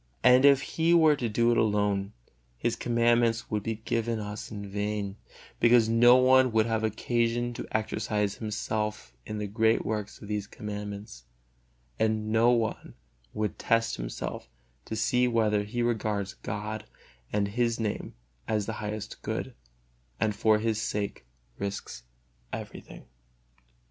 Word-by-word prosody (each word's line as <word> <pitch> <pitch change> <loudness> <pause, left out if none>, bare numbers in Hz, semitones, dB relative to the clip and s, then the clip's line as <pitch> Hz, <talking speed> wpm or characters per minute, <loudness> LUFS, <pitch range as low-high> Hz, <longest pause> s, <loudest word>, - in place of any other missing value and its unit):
And 125 +2 +7
if 140 -1 +6
He 165 +4 +2
were 160 -3 +6
to 120 -3 -2
do 115 +2 +3
it 120 - +3
alone, 105 -2 +1 0.4
His 115 - 0
Commandments 120 -1 +2
would 105 -1 0
be 110 +2 -2
given 115 0 0
us 105 0 -6
in 100 -2 -6
vain, 100 0 -3 0.4
because 120 -1 +5
no 120 +2 +7
one 130 0 +5
would 110 -1 +4
have 110 -1 -1
occasion 120 +2 0
to - - -6
exercise 105 -2 -1
himself 105 - -3
in 105 - -4
the 105 - -2
great 110 +2 +2
works 105 -1 -3
of 105 - -10
these 105 -1 -3
Commandments, 105 - -7 0.7
and 110 -1 0
no 115 +2 +4
one 115 -3 0 0.4
would 105 0 -2
test 115 0 +1
himself - - -5 0.4
to 110 - -4
see 125 +3 +2
whether 110 -3 +2
he 120 +4 -2
regards 110 -4 -1
God 105 +2 -5 0.5
and 100 -1 0
His 115 +2 0
Name 110 -2 -3 0.3
as 105 -2 0
the 110 - -3
highest 105 0 -5
good, - - -4 0.7
and 105 -1 +1
for 110 +1 +4
His 110 0 -1
sake 100 - -3 0.3
risks 100 -10 -5 0.5
everything. - - -8
110 Hz, 145 wpm, -28 LUFS, 105-115 Hz, 0.7 s, And